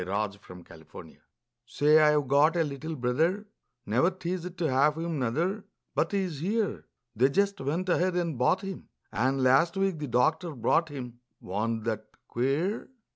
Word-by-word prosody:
HIS 100 +2 -2
NEW 90 0 -10 0.3
BROTHER - - -12 0.5
Say, 150 +4 +4
I've 150 -2 +3
got 145 +5 +4
a 170 - +3
little 150 +2 -5
brother, 160 - 0 0.4
Never 120 - +2
teased 180 -1 -5
to 175 - -1
have 145 +3 +2
him, 165 -2 -3
nuther, 165 - -1 0.3
But - - 0
he's 185 -7 -2
here; 205 +5 -2 0.3
They 130 +5 +4
just 200 +6 0
went 160 +7 -2
ahead 180 0 +1
and 170 -4 -1
bought 125 +9 +2
him, 195 -2 -7 0.2
And, 130 +6 +1
last 140 +8 +4
week 195 -4 0
the 150 - -4
doctor 155 +7 +1
brought 160 +7 +1
him, 125 -4 -8 0.2
Wa'n't 110 +4 -3
that 110 -1 -3 0.2
queer? 145 - -1
150 Hz, 160 wpm, -28 LUFS, 125-180 Hz, 0.5 s, Say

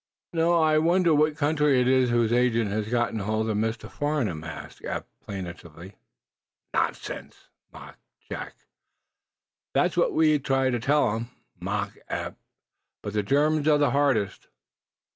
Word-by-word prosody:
"Now 165 +1 +2
I 155 -2 +4
wonder 170 +1 +3
what 150 0 +2
country 150 -3 +2
it 125 - +2
is 130 -1 +4
whose 120 -1 +2
agent 115 -3 +2
has 105 +1 -2
gotten 120 -2 0
hold 110 +2 -1
of 105 - -1
Mr. 110 +2 -2
Farnum?" 130 - -2
asked 80 - -9
Eph, - - -3 0.2
plaintively. 90 -1 -8 0.8
"Nonsense!" - - -3 0.2
mocked - - -12 0.3
Jack. - - -6 1.2
"That's - - +2
what - - +2
we 155 -2 +4
try 135 -1 +1
to 120 - 0
tell 135 -1 +2
'em 115 +1 -3
all," 90 - -36
mocked 100 +2 -3
Eph. - - -3 0.7
"But 105 - -5
the 105 - +1
Germans 145 +7 +2
are 150 -1 +5
the 145 -3 +2
hardest." 135 -9 +1
125 Hz, 145 wpm, -26 LUFS, 105-150 Hz, 1.2 s, are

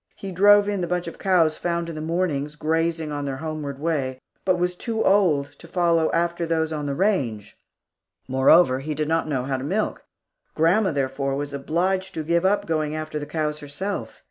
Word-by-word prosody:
He 195 - -7
drove 205 +3 +6
in 200 -2 -1
the 175 - -1
bunch 180 +1 -1
of 170 - -8
cows 170 -5 +3
found 170 -1 -2
in 165 - -5
the 155 - -6
mornings 155 -3 -1
grazing 160 0 -1
on 145 -1 -3
their 135 -1 -3
homeward 150 -2 -5
way, 140 -4 -2 0.2
but 185 -1 +2
was 180 0 0
too 225 +4 -2
old 165 -8 +3
to - - -12
follow 170 -3 +2
after 170 0 0
those 160 -1 0
on 150 -1 -3
the 140 - -2
range. 135 - -1 0.7
Moreover, 130 +1 +5
he 150 +2 -4
did 155 +1 -1
not 165 0 +1
know 135 -4 -1
how 135 0 -1
to 130 - -6
milk. 195 +9 -1 0.5
Grandma, 180 +5 +3
therefore, 135 -1 -1
was 145 0 -4
obliged 185 +7 -1
to 160 - -2
give 170 +3 +1
up 205 +2 +2
going 155 -2 -1
after 155 -1 -4
the 145 - -6
cows 150 0 -2
herself. 150 +8 -5
160 Hz, 195 wpm, -24 LUFS, 145-180 Hz, 0.7 s, drove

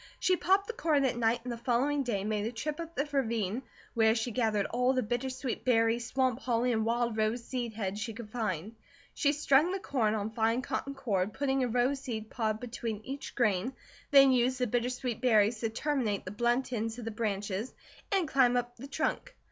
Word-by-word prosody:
She 370 -1 +3
popped 385 +3 +2
the 465 - -5
corn 305 -9 +2
at 250 - +1
night 235 0 +1
and 245 -1 -4
the - - -6
following 260 +4 +1
day 225 -7 -1
made 210 0 -1
a - - -3
trip 295 +6 -4
up 335 0 -6
the 280 - 0
ravine, 230 -5 0 0.3
where 220 -1 +4
she 235 +1 -1
gathered 220 -4 +1
all 250 +2 +1
the 255 -1 +1
bittersweet 255 +3 -3
berries, 230 -1 +2
swamp 255 -2 +1
holly, 245 -1 +1
and 220 -1 +1
wild 235 -1 0
rose 220 +2 0
seed 240 -2 -4
heads 205 -2 -3
she 225 - -3
could 220 -1 -9
find. 215 -4 -3 0.4
She 285 - +2
strung 295 +3 +3
the 385 - -1
corn 225 - 0
on 215 0 -2
fine 225 +2 +1
cotton 275 +1 -3
cord 210 -7 -1
putting 270 -1 0
a - - +1
rose 250 +4 +1
seed 220 -5 -5
pod 220 -2 -1
between 230 -3 -4
each 275 +2 -6
grain, 230 0 +1 0.4
then 275 -2 +7
used 255 0 +2
the 250 - +1
bittersweet 245 0 -2
berries 220 -3 +4
to 225 - -1
terminate 230 -4 -1
the 185 - -5
blunt 240 +4 0
ends 225 0 -2
of 240 - -7
the 225 - -3
branches, 210 0 -2 0.4
and 385 -5 +2
climb 255 -3 +4
up 245 0 -3
the 265 +4 -8
trunk. 320 - -2
240 Hz, 205 wpm, -31 LUFS, 220-265 Hz, 0.4 s, then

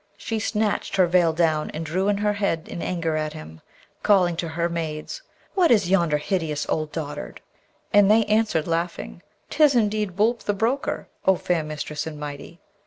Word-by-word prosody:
She 225 +1 -3
snatched 215 -2 -1
her 190 -2 +5
veil 175 -1 +3
down 160 -2 +1
and 160 +1 -4
drew 185 +5 -1
in 205 -1 +2
her 210 0 +1
head 200 -6 -1
in 170 - -6
anger 165 -3 -1
at 155 0 -2
him, 80 - -10 0.4
calling 180 -4 +3
to 170 - -2
her 170 +1 -1
maids, 165 - -4 0.3
'What 365 -3 +3
is 205 -6 +3
yonder 170 -6 +3
hideous 155 -2 -2
old 155 -1 -1
dotard?' 145 - -6 0.5
And 205 -1 +6
they 220 +1 +5
answered, 210 -7 +1
laughing, 165 - -3 0.3
''Tis 300 -3 +4
indeed 210 -4 +1
Boolp 225 +4 +2
the 205 - -2
broker, 235 +7 -1 0.2
O 190 - +6
fair 175 -2 0
mistress 150 0 -5
and 150 -2 -7
mighty!' 150 +3 -8
175 Hz, 175 wpm, -24 LUFS, 155-205 Hz, 0.5 s, And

